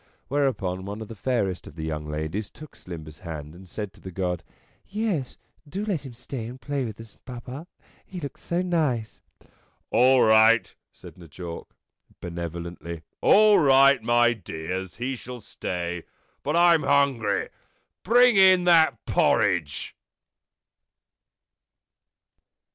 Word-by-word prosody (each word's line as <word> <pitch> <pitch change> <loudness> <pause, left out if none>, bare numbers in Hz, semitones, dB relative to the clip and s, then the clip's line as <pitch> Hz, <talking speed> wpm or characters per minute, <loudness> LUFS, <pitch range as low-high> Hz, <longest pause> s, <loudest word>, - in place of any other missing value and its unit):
Whereupon 105 -10 -1
one 100 +2 -6
of 110 - -13
the 115 - -8
fairest 100 -5 -1
of 75 - -12
the 80 - -6
young 75 -1 -4
ladies 80 +7 -3
took 155 0 -13
Slimber's 80 -4 -10
hand 75 -2 -7
and 90 +1 -14
said 105 0 -6
to - - -19
the 95 - -8
God: 90 -2 -3 0.4
"Yes, 200 - -2 0.3
do 200 +8 -4
let 170 -10 -2
him 120 - -11
stay 125 -1 -6
and 125 +2 -9
play 140 -1 -3
with 110 -2 -7
us, 115 -2 -13
Papa; 125 +5 -8 0.4
he 185 - -8
looks 140 -5 -8
so 175 +1 -1
nice." 150 -11 -1 0.4
" - - -39
All 125 +2 +5
right/' 110 -1 +5 0.2
said - - -14
N' 85 - -13
Jawk, 85 +1 -8 0.4
benevolently. 85 -1 -6
" - - -51
All 210 -1 +6
right, 135 -3 +6
my 120 +1 +3
dears; 90 -2 -6
he 130 +3 -3
shall 125 0 -9
stay. 90 -4 -5 0.4
But 150 +3 -1
I'm 170 -2 +5
hungry. 135 -8 +1 0.5
Bring 240 +2 +5
in 185 -2 +7
that 170 -2 +4
porridge." 75 -6 +1
115 Hz, 140 wpm, -25 LUFS, 90-140 Hz, 0.5 s, in